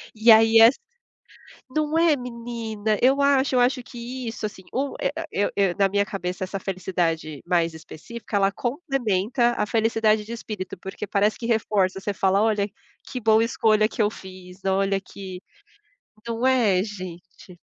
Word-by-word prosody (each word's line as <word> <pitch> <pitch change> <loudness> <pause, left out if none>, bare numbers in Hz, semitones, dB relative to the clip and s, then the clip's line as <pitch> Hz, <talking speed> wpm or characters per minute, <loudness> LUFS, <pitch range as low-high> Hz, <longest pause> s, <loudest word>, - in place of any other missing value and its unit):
E 225 +1 +6
aí 225 +1 +7
é 225 - +10 1.1
não 310 +1 0
é 330 -2 +4
menina? 230 -4 -3
Eu 265 +3 +4
acho 275 -1 +3
eu - - +4
acho 250 +1 +2
que 245 0 -7
isso 225 -1 -4
assim 205 -2 -7
o 275 +1 -2
é - - +1 0.2
eu 205 - 0
eu 195 -3 +2
na 195 -1 +3
minha 200 +1 +1
cabeça 185 -2 -4
essa 195 +1 -4
felicidade 170 -6 -2
mais 170 -2 +1
específica, 185 +8 -9
ela 195 0 +3
complementa 240 - 0
a 210 - +1
felicidade 220 -1 +1
de 225 - -10
espírito, 210 -6 -6
porque 190 +3 -7
parece 205 +2 +1
que 230 - -5
reforça, 205 -4 +1
você 200 +1 -3
fala 195 +1 +2
olha 210 -2 +1 0.4
que 255 - -4
boa 220 -1 +4
escolha 215 -2 +2
que - - -2
eu 205 - +3
fiz, 185 -1 -12
olha 195 0 +1
que 185 -1 -9 0.9
Não 230 +2 -1
é 225 -8 +3
gente? 185 -2 -10
215 Hz, 165 wpm, -24 LUFS, 190-235 Hz, 1.1 s, é